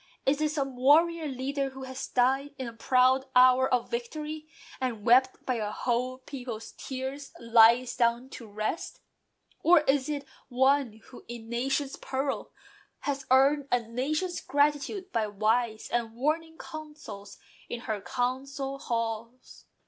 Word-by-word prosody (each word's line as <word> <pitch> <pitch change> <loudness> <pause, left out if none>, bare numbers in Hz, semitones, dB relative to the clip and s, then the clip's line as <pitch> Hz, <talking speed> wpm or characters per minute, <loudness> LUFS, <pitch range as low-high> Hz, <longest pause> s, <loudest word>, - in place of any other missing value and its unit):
Is 280 +2 +2
it 305 - +2
some 275 -3 -2
warrior 315 +5 +4
leader, 275 +1 -2
who 265 0 -9
has 260 0 -6
died 270 +3 +1
In 260 - -4
the 235 - -6
proud 255 +3 +3
hour 255 +1 +6
of 250 -2 0
victory; 300 +6 -4 0.3
and, 240 -5 -3
wept 260 +2 +4
By 255 -2 0
a 210 -2 -2
whole 250 +3 -1
people's 245 -4 -7
tears, 265 +2 -6
lies 235 +1 +5
down 240 +1 +1
to 230 - -9
rest? 215 +9 -4 0.6
Or 345 -1 +6
is 280 -1 +1
it 285 -2 -3 0.2
one 260 -3 +2
who, 250 - -12
in 240 -1 -7
a - - -15
nation's 270 +3 -1
peril, 270 +1 -3 0.5
Has 275 -2 -3
earned 275 +2 +4
a 245 - +4
nation's 285 +10 -2
gratitude 295 +7 0
by 220 -2 0
wise 220 +2 0
And 230 -2 -1
warning 320 +5 -1
counsels 300 -10 -9 0.3
in 240 - -4
her 215 -4 -3
council 270 +3 -3
halls? 230 0 -4
260 Hz, 145 wpm, -28 LUFS, 235-280 Hz, 0.6 s, hour